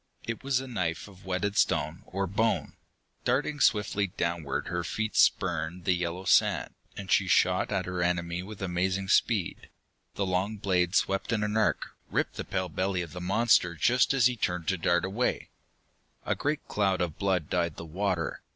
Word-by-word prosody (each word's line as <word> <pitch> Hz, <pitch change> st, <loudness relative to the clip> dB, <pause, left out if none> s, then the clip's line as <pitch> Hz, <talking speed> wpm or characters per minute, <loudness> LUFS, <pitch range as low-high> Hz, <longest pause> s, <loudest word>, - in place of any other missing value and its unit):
It 115 Hz, +2 st, -5 dB
was 135 Hz, -2 st, +1 dB
a 135 Hz, -, -6 dB
knife 90 Hz, -9 st, -2 dB
of 95 Hz, -2 st, -16 dB
whetted 95 Hz, +2 st, -1 dB
stone 80 Hz, -1 st, +1 dB
or 95 Hz, +1 st, -2 dB
bone. 110 Hz, +5 st, 0 dB, 0.5 s
Darting 145 Hz, +4 st, 0 dB
swiftly 105 Hz, -4 st, +2 dB
downward 85 Hz, -4 st, -2 dB
her 90 Hz, -1 st, -2 dB
feet 110 Hz, +6 st, -3 dB
spurned 85 Hz, +2 st, +2 dB
the 90 Hz, -, +4 dB
yellow 90 Hz, +1 st, -3 dB
sand, -, -, +3 dB, 0.2 s
and 95 Hz, -1 st, -6 dB
she 100 Hz, -, +4 dB
shot 90 Hz, +2 st, +3 dB
at 95 Hz, -3 st, 0 dB
her 90 Hz, -1 st, -3 dB
enemy 85 Hz, 0 st, 0 dB
with 100 Hz, +1 st, -8 dB
amazing 95 Hz, +1 st, -1 dB
speed. 105 Hz, -4 st, +1 dB, 0.5 s
The 100 Hz, -, 0 dB
long 95 Hz, +3 st, -1 dB
blade 90 Hz, -2 st, +1 dB
swept 95 Hz, +4 st, +1 dB
in 110 Hz, -2 st, +1 dB
an 105 Hz, 0 st, -1 dB
arc, 110 Hz, -, +1 dB, 0.2 s
ripped -, -, -1 dB
the -, -, -5 dB
pale 95 Hz, 0 st, -2 dB
belly 95 Hz, +2 st, -1 dB
of 85 Hz, -, -10 dB
the 90 Hz, -, -6 dB
monster 95 Hz, -2 st, +3 dB
just 120 Hz, +10 st, +3 dB
as 135 Hz, -4 st, +3 dB
he 125 Hz, 0 st, +4 dB
turned 90 Hz, -6 st, -2 dB
to 95 Hz, -, +1 dB
dart 85 Hz, +1 st, +2 dB
away. 105 Hz, +6 st, -1 dB, 0.8 s
A -, -, +1 dB
great 150 Hz, +1 st, -2 dB
cloud 100 Hz, -3 st, +1 dB
of 85 Hz, -3 st, -2 dB
blood 95 Hz, -6 st, 0 dB
dyed 85 Hz, -3 st, -1 dB
the 85 Hz, -, -8 dB
water. 90 Hz, 0 st, -2 dB
95 Hz, 180 wpm, -28 LUFS, 90-105 Hz, 0.8 s, the